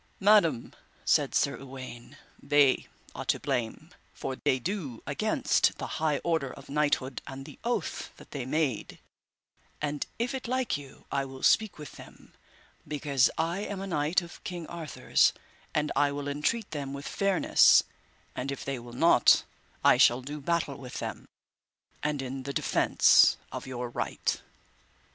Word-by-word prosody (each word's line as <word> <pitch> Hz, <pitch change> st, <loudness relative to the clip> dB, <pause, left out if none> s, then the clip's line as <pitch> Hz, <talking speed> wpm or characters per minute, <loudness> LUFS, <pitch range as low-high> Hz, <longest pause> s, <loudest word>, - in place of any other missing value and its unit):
Madam, 190 Hz, -, +4 dB, 0.3 s
said -, -, +2 dB
Sir -, -, +2 dB
Uwaine, 130 Hz, -3 st, -10 dB, 0.2 s
they 145 Hz, -2 st, +3 dB, 0.3 s
are -, -, -6 dB
to -, -, +1 dB
blame, 115 Hz, -2 st, -3 dB, 0.2 s
for 135 Hz, -, -4 dB
they 135 Hz, 0 st, +1 dB
do 145 Hz, -, -4 dB
against -, -, +1 dB
the -, -, -4 dB, 0.2 s
high 155 Hz, -2 st, +2 dB
order 160 Hz, -6 st, 0 dB
of 140 Hz, -, -13 dB
knighthood, 140 Hz, -3 st, 0 dB
and 135 Hz, 0 st, -7 dB
the -, -, -12 dB
oath 240 Hz, +1 st, -2 dB
that -, -, -15 dB
they 140 Hz, -3 st, -4 dB
made; 135 Hz, -3 st, -1 dB, 0.8 s
and 150 Hz, -1 st, -2 dB
if 235 Hz, +3 st, -1 dB
it 260 Hz, -2 st, -4 dB
like 255 Hz, 0 st, 0 dB
you 140 Hz, -1 st, -10 dB
I 140 Hz, -1 st, 0 dB
will 130 Hz, 0 st, -10 dB
speak 220 Hz, -2 st, +3 dB
with 150 Hz, -2 st, -10 dB
them, -, -, -15 dB, 0.5 s
because 140 Hz, -3 st, +2 dB
I 165 Hz, +3 st, 0 dB
am 205 Hz, -1 st, -4 dB
a 195 Hz, -, -4 dB
knight 170 Hz, 0 st, +1 dB
of 170 Hz, -, -12 dB
King 175 Hz, -2 st, -5 dB
Arthur's, 160 Hz, -4 st, +1 dB, 0.4 s
and 150 Hz, 0 st, +1 dB
I 145 Hz, -1 st, +3 dB
will 145 Hz, 0 st, -4 dB
entreat 155 Hz, +10 st, -1 dB
them 140 Hz, -2 st, -4 dB
with 140 Hz, +1 st, -6 dB
fairness; 195 Hz, -2 st, +5 dB, 0.5 s
and 135 Hz, +2 st, -3 dB
if 140 Hz, -, -6 dB
they 135 Hz, -2 st, -3 dB
will 120 Hz, 0 st, -11 dB
not, 165 Hz, +7 st, +5 dB, 0.4 s
I -, -, +6 dB
shall 120 Hz, +2 st, +5 dB
do 145 Hz, +3 st, -6 dB
battle 165 Hz, -2 st, -1 dB
with 130 Hz, -3 st, -8 dB
them, -, -, -5 dB, 0.7 s
and 150 Hz, -2 st, -1 dB
in 135 Hz, +1 st, -5 dB
the 140 Hz, +2 st, -5 dB
defence -, -, +5 dB
of -, -, -6 dB
your 125 Hz, -1 st, -4 dB
right. 120 Hz, -, -2 dB
145 Hz, 160 wpm, -29 LUFS, 135-170 Hz, 0.8 s, I